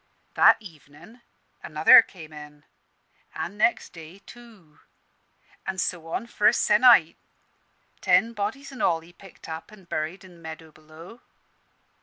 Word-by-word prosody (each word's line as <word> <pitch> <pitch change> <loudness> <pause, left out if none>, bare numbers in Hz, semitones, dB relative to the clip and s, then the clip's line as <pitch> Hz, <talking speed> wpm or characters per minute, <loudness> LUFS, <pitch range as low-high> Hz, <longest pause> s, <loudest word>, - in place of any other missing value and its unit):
That - - +5
evenin' 170 +4 -16 0.4
another - - +6
came 160 -4 -14
in, 150 -1 -13 0.7
an' 195 - -6
next 210 -1 0
day, 165 +1 -12
two; 215 -11 -17 0.9
an' 190 - -4
so 175 -2 -3
on 165 - -4
for 210 -3 0
a - - +5
se'nnight. 210 -6 +4 0.8
Ten 230 +1 +2
bodies 230 +7 -5
in 265 - -9
all 165 -1 +1
he 170 +2 -18
picked 195 0 -16
up 160 +3 -8
and 195 -4 -17
buried 160 +4 -5
i' - - -13
the 180 - -17
meadow 160 -1 -11
below. 155 +8 -16
175 Hz, 140 wpm, -24 LUFS, 160-210 Hz, 0.9 s, another